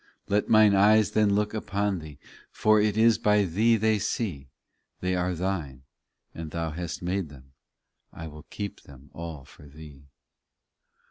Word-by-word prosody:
Let 100 +1 0
mine 110 -2 +6
eyes 105 +2 +4
then 105 -2 +2
look 105 +1 0
upon 100 -3 -2
Thee, 75 -3 -11 0.3
For 110 0 +3
it 105 0 0
is 115 0 +4
by 105 -2 +3
Thee 110 +7 +2
they 110 0 +1
see; 95 - -3 0.5
They 90 0 -1
are 90 0 -1
Thine, 80 -8 -4 0.5
and 80 -1 -7
Thou 80 0 -3
hast 85 +2 -6
made 90 -2 -2
them, 65 -2 -16 0.6
I 80 - -9
will 75 0 -11
keep 100 -1 -6
them 70 0 -16
all 80 -5 -8
for 75 0 -16
Thee. 70 -1 -14
90 Hz, 155 wpm, -26 LUFS, 75-105 Hz, 0.6 s, mine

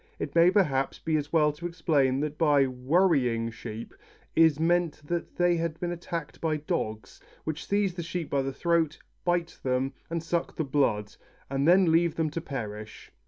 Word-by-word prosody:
It - - -4
may, 170 +1 +6
perhaps, 145 -9 +1
be 160 -1 -1
as 145 -1 -2
well 150 -2 +4
to 150 +4 -6
explain 145 -6 +1
that 150 0 -2
by 145 -4 +4
"worrying" 130 -3 +1
sheep 110 0 -8 0.4
is 160 -2 +5
meant 170 0 +1
that 170 +2 -3
they 175 -1 +3
have 165 -1 -2
been 175 -1 -2
attacked 170 -2 -5
by 155 -2 0
dogs, 110 -8 -4 0.2
which 155 0 -4
seize 200 -2 +1
the 175 - -5
sheep 170 -1 -4
by 140 - 0
the 135 0 -2
throat, 165 +1 +1 0.3
bite 175 -1 -1
them, 130 +1 0 0.2
and 165 -1 -2
suck 170 0 -2
the 160 - -1
blood, 115 -7 0 0.4
and 135 +2 +1
then 180 -1 +6
leave 165 0 +3
them 160 -2 0
to 165 - -3
perish. 110 -8 -7
155 Hz, 180 wpm, -28 LUFS, 135-170 Hz, 0.4 s, may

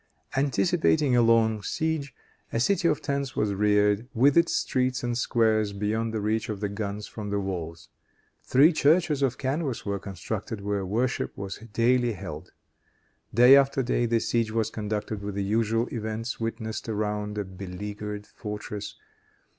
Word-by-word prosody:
Anticipating 145 0 +2
a 120 - +5
long 115 -2 +3
siege, 155 +4 -2 0.4
a 115 - 0
city 175 +6 +2
of 150 -3 0
tents 140 -2 -2
was 105 -1 +1
reared, 105 +2 +2
with 135 +5 +4
its 170 0 +4
streets 130 -1 0
and 120 -1 -1
squares, 110 -4 +2
beyond 110 +3 -1
the 110 - -2
reach 110 +2 -1
of 105 -2 -3
the 105 0 -2
guns 100 0 -4
from 105 -2 -7
the 100 0 0
walls. 85 -4 -5 0.6
Three 150 +6 +5
churches 155 -1 +3
of 130 -2 +1
canvas 135 -1 -2
were 100 -1 -2
constructed, 100 +2 -5
where 100 0 -1
worship 120 +6 -1
was 100 -1 -5
daily 120 +2 +2
held. 95 - -8 0.8
Day 125 +4 +8
after 135 -1 +3
day, 120 0 +1
the 115 0 +2
siege 115 0 0
was 110 -1 -1
conducted 105 -1 -3
with 100 -1 -5
the 100 - -1
usual 115 +3 +1
events 110 0 -4
witnessed 115 0 -4
around 105 -1 -2
a 105 - 0
beleaguered 105 +3 -6
fortress. 105 -1 -6
110 Hz, 155 wpm, -27 LUFS, 105-125 Hz, 0.8 s, Day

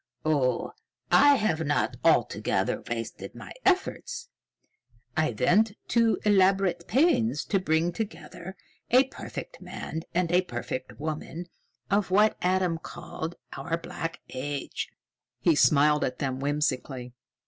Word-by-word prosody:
"Oh, 135 -6 +1 0.4
I 285 +1 +7
have 170 - +1
not 145 -1 0
altogether - - +2
wasted 115 -1 -5
my - - -9
efforts. 470 +5 0 0.9
I 155 0 +2
went 205 - +4 0.2
to 230 -2 +3
elaborate 195 -3 +3
pains 245 - +2
to 195 - +1
bring 165 -1 +1
together 190 -2 -6 0.3
a 255 +2 +6
perfect - - -8
man 160 - -5
and 170 -1 0
a 180 +1 +5
perfect 130 -5 -5
woman 155 +3 -4 0.5
of 200 -1 +2
what 210 +3 +4
Adam 180 -2 +1
called 170 0 -6 0.2
our 165 -1 -2
Black 170 0 -5
Age." 140 +2 -4 0.5
He 165 +7 +4
smiled 150 0 +4
at 125 - -2
them 130 -2 -2
whimsically. 135 -3 -1
170 Hz, 120 wpm, -27 LUFS, 150-205 Hz, 0.9 s, I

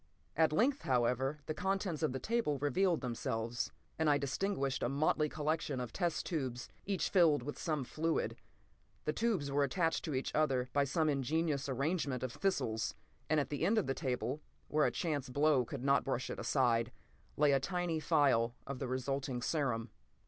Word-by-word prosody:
At 160 0 +4
length, 255 - +2
however, 130 +3 +1
the 155 - -2
contents 190 -2 -1
of 155 - +1
the 130 - -2
table 225 - 0
revealed 160 +6 +2
themselves, 120 -2 -2 0.3
and 160 -1 +3
I 145 - +5
distinguished 140 0 -1
a - - +1
motley 150 +2 +2
collection 150 -3 -1
of 125 -2 -5
test 175 -4 -1
tubes, 130 -7 -3 0.2
each 195 -2 0
filled 160 -8 +5
with 145 +3 -5
some 155 -4 -1
fluid. 160 +5 -1 0.7
The 150 - 0
tubes 195 -12 0
were 145 +1 +3
attached 165 +4 +1
to 155 -5 -2
each 130 - -2
other 135 -5 +1
by 140 0 +3
some 155 +3 +1
ingenious 145 +1 0
arrangement 140 -1 -1
of 130 -2 -3
thistles, 115 - -1 0.3
and 155 0 +4
at 145 - -2
the 145 +1 -2
end 210 +6 +3
of 215 - +2
the 135 - 0
table, 130 0 -2 0.3
where 150 0 +3
a - - 0
chance 145 -6 -2
blow 145 0 +3
could 130 +1 -6
not 140 0 +4
brush 130 -2 -2
it - - -5
aside, 120 -3 +2 0.5
lay 150 -1 +5
a 135 - +4
tiny 175 +1 -1
phial 135 -7 +3
of 140 -2 -5
the 135 - -2
resulting 130 0 -2
serum. 120 -5 -1
145 Hz, 180 wpm, -34 LUFS, 130-160 Hz, 0.7 s, I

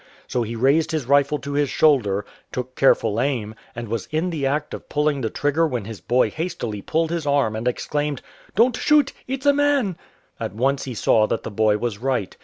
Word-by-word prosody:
So 125 - -1
he 115 0 -3
raised 140 +7 +3
his 155 -5 -1
rifle 140 +2 +3
to 145 0 -6
his 145 -1 +1
shoulder, 105 -10 +2 0.3
took 125 0 -5
careful 115 -4 +3
aim, 120 -6 -1 0.2
and 120 0 -5
was 110 -1 -3
in 160 +4 -1
the 145 -5 -1
act 150 +2 -2
of - - -8
pulling 150 -1 +1
the 110 - -1
trigger 145 +6 +1
when 125 -8 -3
his 105 -5 -8
boy 125 +6 +2
hastily 155 - -4
pulled 160 +8 0
his 165 -3 -2
arm 140 -6 +2
and 110 +3 -3
exclaimed, 145 +2 -2 0.2
" - - -27
Don't 235 +4 +4
shoot 295 -1 +3
— - - -32
it's 265 +1 -4
a 285 - +6
man! 280 -9 +2 0.2
" - - -38
At 110 -3 -4
once 135 +4 0
he 130 -3 -5
saw 110 0 +3
that 115 - -2
the - - -5
boy 105 0 +2
was 110 -2 -3
right. 125 -6 -1
135 Hz, 220 wpm, -22 LUFS, 115-155 Hz, 0.3 s, a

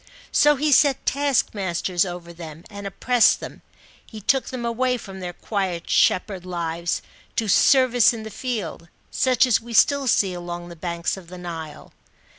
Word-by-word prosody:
So 295 0 +5
he 295 +2 0
set 280 -1 +4
taskmasters 195 - 0
over 175 -1 -8
them 165 -1 -10
and 200 -1 -7
oppressed 240 +4 +3
them. - - -9 0.4
He 220 - -11
took 265 +6 +1
them 250 -2 -5
away 250 +2 0
from 195 -4 -10
their 180 -1 -5
quiet 185 -2 -3
shepherd 185 -1 +2
lives, 170 -1 -3 0.3
to 225 - -1
"service 250 +2 +5
in 225 -2 -6
the 220 - -8
field," 205 -8 -5 0.2
such 255 -1 +3
as 245 -5 +2
we 235 +1 -9
still 280 +3 +4
see 195 -5 +2
along 175 0 -6
the 170 - -10
banks 170 +2 -3
of 185 -3 -12
the 180 +1 -10
Nile. 165 -3 -8
195 Hz, 165 wpm, -23 LUFS, 175-250 Hz, 0.4 s, So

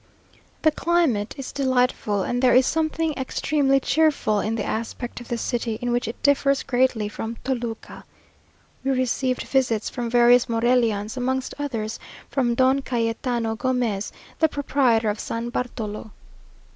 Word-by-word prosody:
The 310 - +5
climate 305 -11 +1
is 275 - -6
delightful, 250 -7 +1
and 245 +5 -1
there 255 -1 +5
is 255 0 +6
something 320 +1 0
extremely 275 +1 +1
cheerful 275 -6 +2
in 220 +2 -1
the 220 - -2
aspect 235 +2 -4
of 240 - -11
the 240 - -2
city, 235 -2 -2
in 245 -1 -2
which 240 -1 0
it 230 - -7
differs 280 -1 +3
greatly 250 -4 +1
from 225 +2 -5
Toluca. 240 -4 -4 0.8
We 270 - -1
received 255 0 0
visits 245 -5 0
from 240 -2 -3
various 240 +1 +5
Morelians, 230 -2 +1
amongst 260 +1 -1
others 225 -7 -3 0.3
from 245 -4 +1
Don 260 +2 +3
Cayetano 230 -2 -1
Gomez, 240 -5 -1 0.3
the 320 - +4
proprietor 255 -7 +2
of 210 - -6
San 230 +1 -4
Bartolo. 225 -3 -4
245 Hz, 145 wpm, -23 LUFS, 225-265 Hz, 0.8 s, is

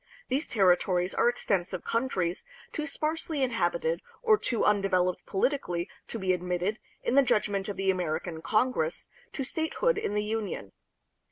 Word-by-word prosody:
These 275 +5 0
territories 180 -2 +3
are 240 - +4
extensive 190 -6 -1
countries, 190 -8 -1 0.3
too 305 -1 -2
sparsely 310 0 -1
inhabited 175 -8 0 0.2
or 440 -2 +6
too 245 - 0
un 210 -1 +4
developed 185 -2 +1
politically 190 -6 0 0.2
to - - -4
be 190 -3 +1
admitted, 180 +4 -1 0.2
in - - 0
the 280 - +7
judgment 205 -5 +1
of 200 - -4
the 195 0 +3
American 170 -2 -2
Congress, 210 -4 0 0.3
to 275 - -2
statehood 320 - 0
in 205 - -2
the 210 - +1
Union. 210 - -3
200 Hz, 150 wpm, -29 LUFS, 180-255 Hz, 0.3 s, the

